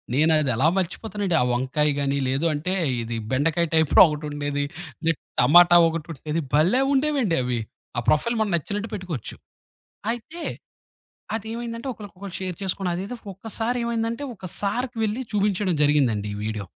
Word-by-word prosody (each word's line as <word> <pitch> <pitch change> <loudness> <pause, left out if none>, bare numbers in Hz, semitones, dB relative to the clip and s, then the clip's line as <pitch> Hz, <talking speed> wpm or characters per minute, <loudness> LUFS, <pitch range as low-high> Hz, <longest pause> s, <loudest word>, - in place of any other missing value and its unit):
నేనది 155 -2 +3
ఎలా 135 +7 +3
మర్చిపోతానండి. 195 0 -1
ఆ - - +4
వంకాయ 130 +5 +1
గాని, 140 0 0
లేదు 135 +5 0
అంటే 155 +5 -2 0.3
ఇది 115 0 -4 0.2
బెండకాయ 155 +5 +2
టైప్‌లో 160 -2 +5
ఒకటుండేది. 145 -1 -3 0.4
లేె 165 - +4 0.3
టమాటా 175 +7 +7
ఒకటుండేది. 160 -1 -3
భలే 175 - +4
ఉండేవండి 270 - +2
అవి. 125 -1 -1 0.4
ఆ - - +3
ప్రొఫైల్ 235 +11 +2
మనం 210 -2 0
నచ్చినట్టు 205 +7 -3
పెట్టుకోవచ్చు. 180 - -5 0.8
అయితే 275 +9 -7 0.9
అదేమైందంటే 230 +3 -4
ఒకళ్ళకొకళ్ళు 200 -4 -10
షేర్ 185 -3 -3
చేసుకోని 190 -1 -1
అదేదో 195 +7 -4 0.2
ఒక్కసారి 225 +4 -3
ఏమైందంటే 230 +2 -2
ఒక 190 - -15 0.2
సారుకి 240 +5 -2
వెళ్ళి 220 +4 -1
చూపించడం 200 -3 +1
జరిగిందండి 130 -9 +2
ఈ - - -6
వీడియో. 105 -2 -3
175 Hz, 135 wpm, -24 LUFS, 145-220 Hz, 0.9 s, టమాటా